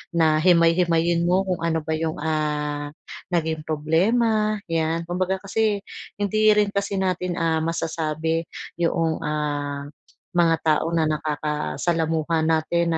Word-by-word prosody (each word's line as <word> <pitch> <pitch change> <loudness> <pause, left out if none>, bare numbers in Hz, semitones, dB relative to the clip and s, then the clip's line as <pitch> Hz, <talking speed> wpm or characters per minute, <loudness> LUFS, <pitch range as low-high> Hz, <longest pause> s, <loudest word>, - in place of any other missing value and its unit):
na 155 -2 +4
himay-himayin 170 -1 +3
mo 185 +2 +3
kung 180 -3 -2
ano 165 -1 0
ba 160 - -1
yung, 160 0 -1
ah, 150 -1 -2 0.4
naging 160 -3 0
problema 215 +8 +2 0.2
'yan. 165 +1 0
Kumbaga 185 +2 -1
kasi 205 0 0 0.3
hindi 215 +2 +1
rin 205 -1 +2
kasi 200 0 -1
natin 180 -2 -1
ah, 165 -1 +1
masasabi 160 0 -1 0.4
yoong, 165 -1 +1
ah, 145 -2 -2 0.5
mga 170 -2 +3
tao 160 +1 +2
na 165 -1 +1
nakakasalamuha 155 - -1
natin 165 +1 +1
165 Hz, 120 wpm, -23 LUFS, 155-180 Hz, 0.5 s, na